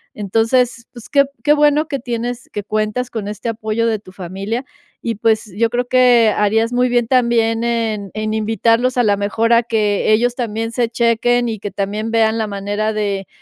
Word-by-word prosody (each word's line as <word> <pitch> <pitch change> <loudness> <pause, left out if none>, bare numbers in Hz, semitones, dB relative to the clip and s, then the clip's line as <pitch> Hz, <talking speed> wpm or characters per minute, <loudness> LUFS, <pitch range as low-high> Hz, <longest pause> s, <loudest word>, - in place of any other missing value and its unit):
Entonces, 230 +4 0
pues, 240 0 -12
qué 280 -1 +4 0.2
qué 295 - +5
bueno 295 +1 +3
que 275 -4 -3
tienes 240 0 -4
que 205 - -4
cuentas 215 +4 -2
con 210 -3 -5
este 210 +3 -6
apoyo 225 +1 -1
de 220 -1 +1
tu 185 -3 -15
familia, 195 +6 -5 0.4
y 230 -1 -2
pues, 220 0 0
yo 230 0 +2
creo 245 +1 -2
que 245 -3 +5
harías 225 +3 +2
muy 250 +1 +2
bien 240 -2 +1
también 235 -2 +2
en 225 -4 -2
en 215 0 -3
invitarlos 230 +3 +1
a 245 - +4
la 205 -2 +2
mejor 220 +3 +1
a 235 +1 +4
que, 215 -2 +1
ellos 240 +2 +2
también 225 -2 -3
se 235 -1 0
chequen 235 +1 +1
y 220 - -3
que 205 - -6
también 210 +3 -3
vean 225 0 +2
la 220 - 0
manera 205 +2 -2
de, 200 -2 -2
225 Hz, 190 wpm, -18 LUFS, 215-240 Hz, 0.4 s, qué